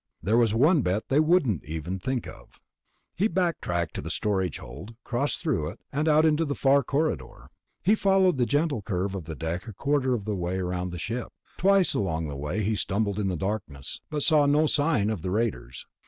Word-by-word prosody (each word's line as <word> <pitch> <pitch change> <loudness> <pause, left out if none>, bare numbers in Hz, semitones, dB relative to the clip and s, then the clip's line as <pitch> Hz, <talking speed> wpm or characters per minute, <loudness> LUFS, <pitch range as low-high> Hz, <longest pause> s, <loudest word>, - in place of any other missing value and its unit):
There 105 +4 +2
was 115 -3 +3
one 150 +6 +4
bet 95 +1 -1
they 140 - +4
wouldn't 155 - +2
even 80 +5 -4
think 130 +4 -2
of. - - -13 0.5
He 200 +6 +1
backtracked 165 - -1
to - - -4
the - - -6
storage 95 -7 -1
hold, 100 - -10
crossed 130 +4 -1
through 130 - 0
it, - - -11
and 150 +3 -1
out 155 +1 +5
into 155 +1 +3
the 140 -3 -2
far 140 +1 +4
corridor. 145 +5 -2 0.3
He 200 - +4
followed 190 -7 +3
the 120 - +2
gentle 145 -4 +1
curve 95 -1 -2
of 95 -5 -5
the 80 0 -6
deck 85 +7 -4
a 110 - -7
quarter 135 +3 +1
of 105 -4 -5
the 110 - -1
way 90 -1 -2
around 90 0 -2
the 90 - -5
ship. 115 +8 -4 0.3
Twice 195 0 +4
along 80 -5 -1
the 70 - -5
way 75 +10 -2
he 110 +3 +1
stumbled 100 +1 -1
in 100 - 0
the 90 -2 -1
darkness, 90 -8 -4
but 150 -2 -2
saw 150 -2 +4
no 150 +2 +4
sign 145 -9 +2
of 105 -7 -4
the 90 - -3
raiders. 105 - -2
110 Hz, 210 wpm, -26 LUFS, 90-150 Hz, 0.5 s, out